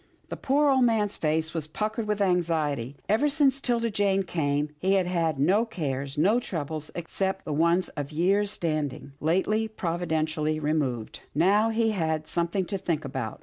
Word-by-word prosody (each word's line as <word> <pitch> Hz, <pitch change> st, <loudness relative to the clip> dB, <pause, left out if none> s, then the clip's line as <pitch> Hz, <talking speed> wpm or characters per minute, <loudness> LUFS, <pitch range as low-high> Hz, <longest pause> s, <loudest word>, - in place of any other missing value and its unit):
The -, -, -4 dB
poor 285 Hz, +2 st, +2 dB
old 260 Hz, -1 st, +4 dB
man's 215 Hz, -4 st, +2 dB
face 160 Hz, +1 st, 0 dB
was 160 Hz, -3 st, -2 dB
puckered 215 Hz, +6 st, -3 dB
with 210 Hz, -1 st, +1 dB
anxiety. 155 Hz, -8 st, 0 dB
Ever 225 Hz, +9 st, +3 dB
since 275 Hz, -2 st, +2 dB
'Tilda 235 Hz, -3 st, 0 dB
Jane 200 Hz, -1 st, +2 dB
came, 150 Hz, -4 st, -1 dB
he 190 Hz, +4 st, +2 dB
had 190 Hz, -2 st, +2 dB
had 165 Hz, -4 st, 0 dB
no 190 Hz, +10 st, +4 dB
cares, 140 Hz, -, -4 dB
no 200 Hz, +10 st, +4 dB
troubles, 155 Hz, -, -4 dB
except 190 Hz, +3 st, -3 dB
the 150 Hz, -, -2 dB
one 170 Hz, +4 st, +3 dB
of 145 Hz, -1 st, -4 dB
years' 195 Hz, +6 st, +2 dB
stand 155 Hz, -7 st, -1 dB
ing, -, -, -11 dB
lately 190 Hz, +7 st, +1 dB
providentially 160 Hz, -5 st, -1 dB
removed. 145 Hz, -7 st, -1 dB, 0.2 s
Now 200 Hz, +8 st, +4 dB
he 225 Hz, 0 st, +1 dB
had 160 Hz, -5 st, -1 dB
something 170 Hz, +4 st, -1 dB
to 195 Hz, +1 st, -3 dB
think 160 Hz, -4 st, -2 dB
about. 130 Hz, -5 st, -4 dB
170 Hz, 170 wpm, -27 LUFS, 155-210 Hz, 0.2 s, old